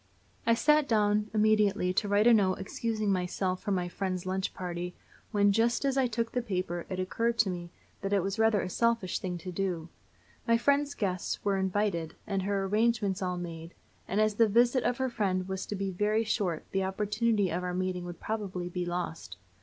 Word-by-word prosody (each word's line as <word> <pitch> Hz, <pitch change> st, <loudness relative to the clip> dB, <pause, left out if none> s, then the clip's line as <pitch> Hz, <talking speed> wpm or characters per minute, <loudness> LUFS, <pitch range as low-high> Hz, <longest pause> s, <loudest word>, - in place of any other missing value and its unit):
I 230 Hz, -, +5 dB
sat 300 Hz, +3 st, +4 dB
down 210 Hz, -1 st, +2 dB
immediately 210 Hz, -3 st, +3 dB
to 205 Hz, -, +1 dB
write 205 Hz, +1 st, +3 dB
a 240 Hz, -, +7 dB
note 190 Hz, -4 st, +4 dB
excusing 215 Hz, +1 st, -2 dB
myself 185 Hz, 0 st, -1 dB
from 205 Hz, -2 st, 0 dB
my 180 Hz, -1 st, -1 dB
friend's 185 Hz, 0 st, -3 dB
lunch 190 Hz, +1 st, -1 dB
party, 180 Hz, -1 st, -5 dB, 0.4 s
when, 205 Hz, -2 st, +4 dB
just 230 Hz, +6 st, +2 dB
as 270 Hz, -1 st, +1 dB
I 265 Hz, -2 st, +3 dB
took 230 Hz, 0 st, -2 dB
the 250 Hz, -, 0 dB
paper, 180 Hz, -6 st, -3 dB
it 185 Hz, -, -3 dB
occurred 230 Hz, +5 st, 0 dB
to 205 Hz, -4 st, +3 dB
me 175 Hz, -1 st, -6 dB, 0.3 s
that 195 Hz, -, -3 dB
it 200 Hz, -3 st, +2 dB
was 195 Hz, +3 st, -3 dB
rather 220 Hz, -3 st, +4 dB
a -, -, -3 dB
selfish 230 Hz, -1 st, +1 dB
thing 180 Hz, -2 st, -3 dB
to 180 Hz, +2 st, -7 dB
do. 175 Hz, -3 st, -2 dB, 0.6 s
My 230 Hz, 0 st, +5 dB
friend's 285 Hz, +3 st, +2 dB
guests 185 Hz, -2 st, -2 dB
were 200 Hz, -1 st, +2 dB
invited, 190 Hz, -4 st, -1 dB
and 195 Hz, -2 st, -1 dB
her 195 Hz, 0 st, 0 dB
arrangements 210 Hz, -1 st, +1 dB
all 180 Hz, -1 st, -1 dB
made; 165 Hz, -1 st, -7 dB, 0.3 s
and 195 Hz, -, 0 dB
as 215 Hz, 0 st, +3 dB
the 225 Hz, +2 st, +4 dB
visit 240 Hz, +4 st, +3 dB
of 245 Hz, -, +1 dB
her 260 Hz, -1 st, -1 dB
friend 190 Hz, -5 st, 0 dB
was 190 Hz, 0 st, -4 dB
to 210 Hz, -, -3 dB
be 195 Hz, 0 st, -2 dB
very 210 Hz, +4 st, +1 dB
short 190 Hz, -6 st, -1 dB
the 195 Hz, 0 st, 0 dB
opportunity 205 Hz, +1 st, 0 dB
of 175 Hz, +2 st, -1 dB
our 180 Hz, 0 st, -2 dB
meeting 185 Hz, -1 st, -2 dB
would 175 Hz, -1 st, -7 dB
probably 190 Hz, -5 st, -3 dB
be 180 Hz, 0 st, -3 dB
lost. 165 Hz, -, -4 dB
195 Hz, 200 wpm, -30 LUFS, 180-220 Hz, 0.6 s, a